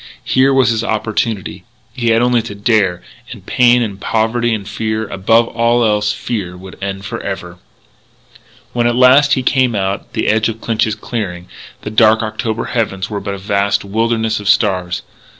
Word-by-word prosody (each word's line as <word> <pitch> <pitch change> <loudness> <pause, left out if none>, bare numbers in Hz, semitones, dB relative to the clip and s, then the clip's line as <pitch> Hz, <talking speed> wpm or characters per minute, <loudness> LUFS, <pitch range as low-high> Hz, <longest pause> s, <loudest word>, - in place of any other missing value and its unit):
Here 130 +4 +3
was 135 -2 +3
his 115 0 -1
opportunity. 110 -2 -2 0.3
He 120 -3 -3
had 115 +1 +3
only 125 -1 +2
to 110 -2 -8
dare; 100 -4 +1 0.3
and 100 -6 -10
pain 125 -1 +4
and 100 -3 -5
poverty 115 +2 0
and 105 -3 -3
fear 110 +1 -3
above 115 +5 +2
all 120 0 +2
else 105 -1 +1
fear 100 -4 -4
would 95 0 -12
end 95 0 -4
forever!... 90 -2 -6 1.1
When, 120 -1 +1
at 120 - +1
last, 130 +3 +5
he 130 - 0
came 130 -3 +2
out 95 0 -2
to - - -32
the - - -1
edge 110 +1 +2
of 115 0 -6
Clinch's 110 -2 0
clearing, 95 -6 -5 0.3
the 105 - -5
dark 110 0 +4
October 110 +1 -3
heavens 105 -4 -2
were 105 - -2
but 100 0 -4
a - - -7
vast 100 +1 0
wilderness 110 +1 0
of 100 -1 -3
stars. 90 -5 +1
110 Hz, 175 wpm, -16 LUFS, 100-115 Hz, 1.1 s, last